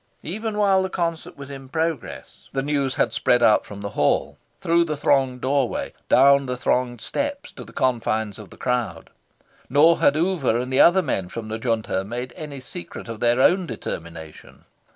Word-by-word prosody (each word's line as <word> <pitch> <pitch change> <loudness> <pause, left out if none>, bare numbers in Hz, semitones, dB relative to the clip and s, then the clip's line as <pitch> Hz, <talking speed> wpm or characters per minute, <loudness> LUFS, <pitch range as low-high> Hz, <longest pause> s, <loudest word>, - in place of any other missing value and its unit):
Even 215 +5 -4
while 195 -2 +4
the 190 - -2
concert 170 -1 -3
was 140 0 -9
in 135 -1 -9
progress, 160 -2 -4
the 135 - -1
news 140 -2 -1
had - - +1
spread 120 -1 +2
out 110 - +4
from 100 -1 -9
the 100 - -4
Hall, - - 0 0.2
through 170 +1 +3
the 155 -3 -3
thronged 130 -3 +1
doorway, 135 -2 -1 0.2
down 140 +1 +5
the 125 0 -3
thronged 125 -1 0
steps, 285 - -4
to - - -10
the - - -14
confines 110 -4 -1
of 105 - -11
the - - -15
crowd. 125 -2 -2 0.6
Nor 155 +5 +5
had 145 - +4
Oover 155 -8 +1
and 125 +1 -4
the 130 - +5
other 185 +2 +6
men 95 - -2
from 110 +1 -6
the 110 +1 -4
Junta 110 -5 -1
made 120 +4 -6
any 150 -3 -7
secret 170 +4 -8
of 115 -2 -7
their 120 +1 +2
own 180 +6 +4
determination. 80 - -8
135 Hz, 185 wpm, -23 LUFS, 120-165 Hz, 0.6 s, other